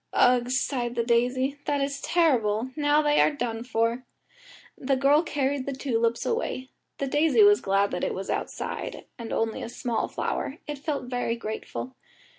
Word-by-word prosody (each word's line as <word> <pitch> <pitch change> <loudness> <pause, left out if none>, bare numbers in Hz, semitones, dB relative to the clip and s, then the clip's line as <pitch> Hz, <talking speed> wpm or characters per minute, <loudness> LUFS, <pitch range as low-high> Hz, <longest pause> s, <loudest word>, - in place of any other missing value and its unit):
"Ugh!" 245 -1 +4
sighed 250 -1 -1
the 235 - +1
daisy, 255 +4 +1
"that 290 -1 +1
is 280 0 -2
terrible; 250 -8 +2
now 295 0 +3
they 295 0 +4
are - - +5
done 235 -6 -3
for." 230 +1 0 0.7
The 270 0 0
girl 280 +3 +4
carried 280 -4 -1
the 280 - -1
tulips 235 -3 0
away. 265 - -2 0.3
The 275 - -1
daisy 300 +8 +4
was 410 0 +6
glad 200 +1 +2
that - - -3
it - - -1
was 195 - -5
outside, - - -4
and 230 -1 -6
only 225 0 -1
a - - -5
small 240 -1 -2
flower 275 - -3
it 295 -2 -5
felt 290 -1 -2
very 245 -2 -2
grateful. 215 - -6
255 Hz, 170 wpm, -26 LUFS, 235-285 Hz, 0.7 s, was